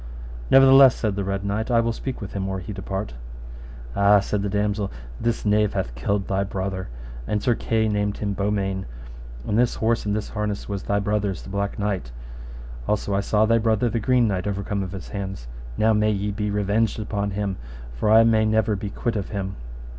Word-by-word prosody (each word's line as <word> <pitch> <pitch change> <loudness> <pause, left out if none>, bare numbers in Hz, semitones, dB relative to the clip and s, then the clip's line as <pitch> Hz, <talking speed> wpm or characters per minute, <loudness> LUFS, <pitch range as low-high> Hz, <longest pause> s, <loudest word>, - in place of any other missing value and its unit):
Nevertheless, 135 -1 +8
said 105 -4 -1
the 100 - -2
Red 100 +1 -2
Knight, 105 +4 -1
I 120 -1 +4
will 115 0 +1
speak 130 +1 -5
with 100 - -6
him 95 -1 -2
or 95 - -2
he 95 +3 -6
depart. 95 - -4 0.8
Ah, 100 +1 +6
said 100 +1 -1
the 100 - -1
damosel, 105 0 -1 0.3
this 115 -1 -1
knave 105 0 +2
hath - - -2
killed 95 +11 -1
thy 95 0 +1
brother, 95 -2 -4 0.4
and 105 - 0
Sir 120 - +3
Kay 110 -1 0
named 105 -1 0
him 100 -1 -2
Beaumains, 100 -1 -1 0.6
and 105 - +1
this 120 -1 +2
horse 115 +1 +1
and 105 - +1
this 105 - -3
harness 105 -1 -3
was 100 -2 -3
thy 100 - 0
brother's, 100 -2 -1
the - - -9
Black 100 +1 -2
Knight. 100 -12 -2 0.8
Also 105 -1 0
I 100 - +2
saw 105 +2 +2
thy 115 +1 +3
brother 115 +1 +2
the 115 - 0
Green 125 +1 +3
Knight 95 -2 -1
overcome 100 0 -2
of 95 -2 -4
his 95 -4 -7
hands. 95 - -5 0.3
Now 110 +1 +4
may 105 0 +3
ye 105 0 -1
be 105 0 -2
revenged 105 +2 +1
upon 100 -1 -2
him, 100 -1 -2 0.4
for - - -1
I 110 +1 +7
may 110 -1 +4
never 110 -1 +2
be 100 +1 -4
quit 115 +3 -2
of 100 -4 -3
him. 95 -1 -4
105 Hz, 205 wpm, -24 LUFS, 100-110 Hz, 0.8 s, Nevertheless